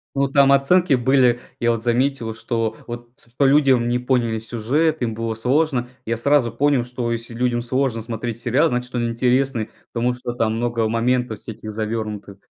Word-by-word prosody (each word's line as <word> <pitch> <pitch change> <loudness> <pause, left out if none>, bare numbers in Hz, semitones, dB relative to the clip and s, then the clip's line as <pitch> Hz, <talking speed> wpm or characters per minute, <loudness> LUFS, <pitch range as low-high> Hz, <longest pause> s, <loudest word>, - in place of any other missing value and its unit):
Ну, 140 0 +2
там 140 0 +4
оценки 150 +5 +4
были, 125 -1 +3 0.2
я 120 0 +2
вот 115 - -7
заметил, 120 -1 0
что 115 -1 -2
вот 120 0 -8
св 120 +1 -18
по - - +3
людям 135 -3 +4
не 120 +1 +1
поняли 125 -3 0
сюжет, 130 +8 0
им 115 -2 -1
было 115 0 -3
сложно. 125 +1 0 0.2
Я 115 +1 -1
сразу 135 -1 +2
понял, 135 +2 +2
что 120 -1 -4
если 115 0 -4
людям 120 0 0
сложно 125 -1 -1
смотреть 115 0 -5
сериал, 130 +7 +2
значит 125 +1 -3
он 120 -1 0
интересный, 125 -1 0 0.2
потому 120 +1 0
что 125 -1 -5
там 110 -2 0
много 115 -1 0
моментов 115 -1 0
всяких 110 0 -8
завернутых. 105 -2 -4
120 Hz, 175 wpm, -21 LUFS, 115-130 Hz, 0.2 s, там